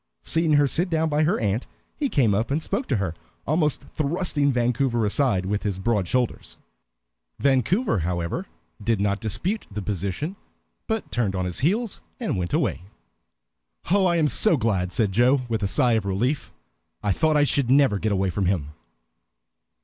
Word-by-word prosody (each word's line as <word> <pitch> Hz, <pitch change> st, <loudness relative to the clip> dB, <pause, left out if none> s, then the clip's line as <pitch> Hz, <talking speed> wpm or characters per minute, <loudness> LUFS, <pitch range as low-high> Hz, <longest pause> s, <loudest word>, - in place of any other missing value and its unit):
Seeing 165 Hz, -1 st, +1 dB
her 145 Hz, -1 st, +5 dB
sit 170 Hz, +6 st, 0 dB
down 160 Hz, -1 st, +1 dB
by 150 Hz, +1 st, +2 dB
her 165 Hz, -, +1 dB
aunt, 105 Hz, +3 st, -1 dB, 0.3 s
he 285 Hz, -2 st, -1 dB
came 120 Hz, -, +2 dB
up 110 Hz, +4 st, 0 dB
and 140 Hz, +3 st, +1 dB
spoke 245 Hz, -, -3 dB
to -, -, +1 dB
her, 95 Hz, -6 st, -1 dB, 0.3 s
almost 150 Hz, -1 st, +1 dB
thrusting 145 Hz, 0 st, 0 dB
Vancouver 120 Hz, -1 st, +1 dB
aside 105 Hz, -4 st, +1 dB
with 105 Hz, +2 st, -1 dB
his 100 Hz, -3 st, -2 dB
broad 100 Hz, -2 st, 0 dB
shoulders. 120 Hz, -, -2 dB, 0.8 s
Vancouver, 140 Hz, -, +2 dB
however, 90 Hz, -, -2 dB, 0.4 s
did 115 Hz, -2 st, +1 dB
not 100 Hz, 0 st, 0 dB
dispute 120 Hz, -, -2 dB
the 105 Hz, 0 st, -5 dB
position, 100 Hz, -, -3 dB, 0.5 s
but 220 Hz, -1 st, -3 dB
turned 110 Hz, -5 st, 0 dB
on 90 Hz, 0 st, -1 dB
his 90 Hz, -1 st, -2 dB
heel 210 Hz, -, +1 dB, 0.3 s
and 230 Hz, -, -1 dB
went 90 Hz, -2 st, -2 dB
away. -, -, 0 dB, 1.1 s
"Oh, 195 Hz, -1 st, +4 dB
I 175 Hz, -, +2 dB
am 160 Hz, -3 st, +3 dB
so 170 Hz, +3 st, +3 dB
glad," 95 Hz, -7 st, 0 dB
said 105 Hz, 0 st, +1 dB
Joe, 125 Hz, +6 st, +3 dB
with 110 Hz, -2 st, -2 dB
a 100 Hz, -, +1 dB
sigh 120 Hz, +6 st, +2 dB
of 110 Hz, -3 st, 0 dB
relief. 120 Hz, +10 st, -1 dB, 0.5 s
"I 105 Hz, -, +1 dB
thought 155 Hz, -, +2 dB
I 145 Hz, -, +5 dB
should 140 Hz, -3 st, +1 dB
never 135 Hz, -6 st, +4 dB
get 110 Hz, +1 st, -1 dB
away 95 Hz, -1 st, +1 dB
from 95 Hz, 0 st, -1 dB
him!" 80 Hz, -6 st, -1 dB
120 Hz, 175 wpm, -24 LUFS, 100-150 Hz, 1.1 s, her